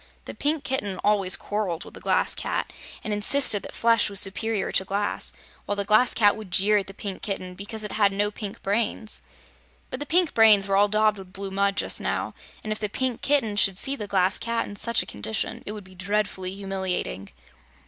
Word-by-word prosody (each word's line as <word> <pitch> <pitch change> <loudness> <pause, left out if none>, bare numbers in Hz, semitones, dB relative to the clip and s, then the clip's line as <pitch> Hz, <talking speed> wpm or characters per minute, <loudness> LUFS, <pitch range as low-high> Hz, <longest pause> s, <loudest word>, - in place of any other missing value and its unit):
The - - -7
Pink 300 0 -1
Kitten 205 -9 -2
always 200 -3 +4
quarreled 200 -5 -3
with - - -12
the - - -9
Glass - - +1
Cat - - -3 0.3
and 215 - -2
insisted 210 0 +4
that - - -9
flesh 230 -2 +3
was 200 -1 +1
superior 205 +1 0
to - - +2
glass, 200 +2 -2 0.4
while 205 - 0
the 200 0 -1
Glass 215 +5 +4
Cat 205 -3 +4
would 215 -3 -9
jeer 205 +4 +3
at 195 - -6
the 195 - -8
Pink 200 -2 -6
Kitten, 185 -3 -4
because 205 +3 -6
it 210 - -5
had 205 -2 +3
no 205 +1 0
pink 210 +1 -7
brains. 215 +1 -1 0.7
But 255 - -3
the 290 - -5
pink 350 -1 +2
brains 215 -3 +6
were 195 - +1
all 205 +1 +5
daubed 215 0 +2
with 185 -1 -11
blue 195 0 -5
mud, 200 +1 +1
just - - 0
now, - - -2 0.3
and 215 - -4
if 215 - -2
the 210 - -2
Pink 255 +2 -2
Kitten 270 -8 +1
should 195 -2 +4
see 270 +7 +1
the 210 -6 -6
Glass 190 -1 +2
Cat 230 0 -1
in 205 - -9
such 235 +3 +1
a - - -13
condition, 110 +2 -3
it - - -2
would 210 -1 -8
be 185 0 -16
dreadfully 195 -1 -2
humiliating. 190 - -4
205 Hz, 215 wpm, -25 LUFS, 195-220 Hz, 0.7 s, brains